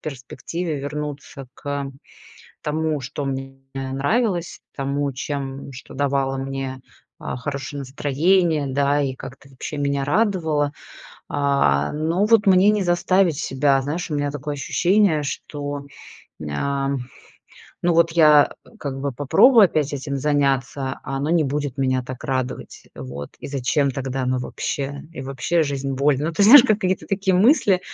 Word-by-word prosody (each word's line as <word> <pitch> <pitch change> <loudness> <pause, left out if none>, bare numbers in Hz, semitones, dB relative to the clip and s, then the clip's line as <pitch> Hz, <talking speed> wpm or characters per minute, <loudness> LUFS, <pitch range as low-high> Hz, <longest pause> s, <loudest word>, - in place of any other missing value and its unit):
перспективе 155 +4 -5
вернуться 145 -2 -6
к 140 -1 -4 0.7
тому, 155 0 -1
что 135 +2 -5
мне 135 0 -4 0.2
нравилось, 165 - -1 0.2
тому, 140 0 -1
чем 135 +1 -5
что 125 - -11
давало 135 -1 0
мне, 135 -1 -4 0.4
а, - - -5
хорошее 140 +2 -5
настроение, 150 +4 +1
да, 140 +2 +1
и 135 -2 -1
как-то 135 +1 -11
вообще 135 +3 -7
меня 140 -1 0
радовало. 160 -5 +1 0.6
А, 140 - +2
но 165 +6 +1
вот 220 -1 +4
мне 190 +1 +6
не 210 -2 +2
заставить 175 -2 +2
себя, 135 -1 +1
знаешь, 165 +6 -3
у 150 - 0
меня 145 0 0
такое 145 +1 -4
ощущение, 175 +2 +2
что 145 +1 -5 0.6
м, 75 - -5
ам. 140 - -1 0.9
Ну 175 - +3
вот 165 0 +4
я, 150 -3 +5
э, - - -17
как 135 -2 -4
бы 140 -1 -2
попробую 210 - +6
опять 155 -3 -1
этим 140 0 -3
заняться, 135 -2 0
а 135 - -4
оно 145 +3 -1
не 165 -2 +3
будет 145 -1 -3
меня 130 -1 +1
так 130 +1 -8
радовать, 130 -2 -4
вот, 70 +2 -7
и - - -8
зачем 140 +1 0
тогда 135 0 -3
оно 130 0 0
вообще? 140 +2 -4
И 135 - -7
вообще, 135 +5 0
жизнь- 140 -2 -2
боль, 140 0 +2
ну, 160 +2 -1
ты 185 - +1
знаешь, 235 +6 +10
какие-то 200 -5 0
такие 195 -1 0
мысли, 205 - +4
145 Hz, 150 wpm, -22 LUFS, 135-160 Hz, 0.9 s, знаешь